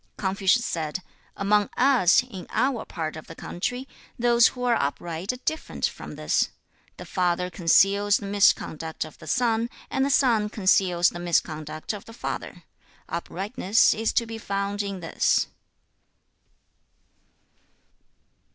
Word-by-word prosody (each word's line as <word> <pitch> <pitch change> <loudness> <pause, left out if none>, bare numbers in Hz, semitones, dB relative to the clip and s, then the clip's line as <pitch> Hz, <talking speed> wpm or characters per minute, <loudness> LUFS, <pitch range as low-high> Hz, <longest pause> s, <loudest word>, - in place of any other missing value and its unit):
2. - - -11
Confucius 195 +5 +2
said, 160 +2 -3 0.3
'Among 205 +1 +2
us, 245 -7 +5
in 195 -8 -9
our 260 -3 0
part 155 -2 -4
of 155 - -10
the - - -10
country, 245 +9 -4 0.3
those 240 -1 +5
who 250 - -5
are 245 -1 +3
upright 165 - -2
are - - -6
different 315 - -2
from - - -6
this. - - +1 0.5
The - - -9
father 180 -1 0
conceals 195 +4 +4
the 205 - -7
misconduct 165 -6 +1
of 155 - -13
the - - -12
son, 235 -2 +1 0.2
and 265 -1 +1
the 275 - +1
son 235 -7 +3
conceals 185 -4 +3
the 175 - -8
misconduct 155 -1 -2
of 205 0 -8
the 225 - -12
father. - - -6 0.5
Uprightness 195 +4 +1
is 225 +1 -1
to 235 - +2
be 225 0 -7
found 200 -1 -2
in 200 -2 -5
this.' 165 - +1
200 Hz, 140 wpm, -25 LUFS, 175-230 Hz, 0.5 s, us